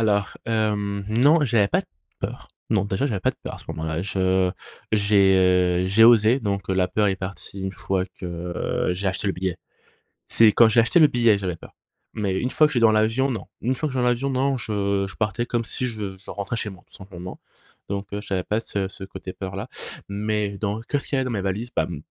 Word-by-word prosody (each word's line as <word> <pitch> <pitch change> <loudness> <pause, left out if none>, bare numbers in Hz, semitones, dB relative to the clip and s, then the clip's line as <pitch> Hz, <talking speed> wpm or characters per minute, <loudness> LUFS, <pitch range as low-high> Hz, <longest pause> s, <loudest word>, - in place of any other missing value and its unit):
Alors, 100 -2 +1
hem, 105 -3 -1
non, 145 +8 +4
j'avais 115 -6 +3
pas - - +2
de - - -14 0.3
peurs. - - -5 0.2
Non, 105 -3 +2
déjà, 100 +6 -1
j'avais 105 -9 -2
pas - - +2
de - - -17
peurs - - -5
à - - -11
ce - - -14
moment-là. 80 0 -3
Je 95 -1 +1 0.4
j'ai, 100 -2 +4 0.5
heu, - - 0
j'ai 105 +4 +6
osé, 115 +1 +6
donc 100 -4 -2
heu, - - +1
la 95 -1 +2
peur 105 +1 +2
est 95 - 0
partie 95 +1 -7
une 95 0 -3
fois 95 -1 -1
que, 95 0 -9 0.6
heu, - - 0
j'ai 95 +2 -1
acheté 95 +2 -3
le 100 - +2
billet. 90 -1 -3 0.7
C'est 115 - +5
quand 115 +1 +6
j'ai 115 +1 +5
acheté 115 +9 +3
le 160 - +8
billet 120 -5 +3
que - - -6
j'avais 90 -4 -3
peur - - -14 0.4
mais 100 -4 -1
une 125 - -1
fois 155 - +5
que - - -4
je - - -7
suis 120 - +2
dans 115 -1 +6
l'avion, 110 +5 +2
non. 115 - -4 0.2
Une 125 +3 0
fois 155 - -2
que - - -7
je 130 - -2
suis - - +2
dans 125 - +3
l'avion 120 +3 0
non, 135 +1 +1
je 100 -4 -1
je - - -11
partais 110 +2 -1
comme 120 -1 -1
si 125 - -3
je 105 -5 -5
je 95 - -12
rentrais 100 +3 -4
chez 110 -2 -3
moi, 95 -3 -13
tout - - -15
simplement, 90 -2 -9 0.5
donc 100 0 -4
heu, 100 - -3
j'avais 95 -3 -2
pas 105 +4 -1
ce 100 -4 -3
ce 95 - -10
côté 95 -1 -8
peur-là 95 +5 -6 0.4
mais 105 0 -2
dans 105 +1 -2
qu'est-ce 140 +5 -2
qu'il 140 - -1
y - - +1
avait 130 - +1
dans - - -2
mes 105 -5 -2
valises? 100 +5 -2
Bah, 80 - +3
mmh, 85 -4 -6
105 Hz, 250 wpm, -24 LUFS, 95-115 Hz, 0.7 s, le